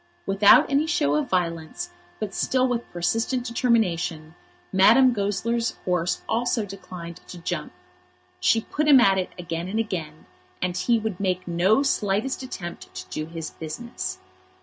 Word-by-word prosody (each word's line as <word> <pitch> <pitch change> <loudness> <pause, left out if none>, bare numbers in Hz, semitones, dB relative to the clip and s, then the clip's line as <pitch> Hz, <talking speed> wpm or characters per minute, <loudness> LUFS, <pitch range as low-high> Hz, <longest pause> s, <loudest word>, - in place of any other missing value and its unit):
Without 200 +1 +6
any 285 +3 +1
show 145 - +1
of 150 - 0
violence, 165 - -2 0.3
but 210 -3 -4
still 255 +4 +1
with 240 -1 -2
persistent 225 +8 0
determination, 180 -10 0 0.4
Madame 235 +7 +6
Goesler's 230 +3 -1
horse 180 -1 0
also 235 -1 0
declined 180 -3 -9
to 180 - -9
jump. 170 -2 -4 0.7
She 225 - +3
put 300 +6 -2
him 280 -3 +8
at 195 -5 +4
it 185 - -2
again 170 -1 -4
and 205 +4 -3
again, 165 -8 -4 0.3
and 180 -1 -1
he 235 +5 +2
would 215 -4 -3
make 185 -2 -1
no 185 +9 +3
slightest 215 0 0
attempt 180 -9 -7
to - - -7
do 155 0 -4
his 165 -1 -6
business. 155 - -6
195 Hz, 150 wpm, -25 LUFS, 170-235 Hz, 0.7 s, him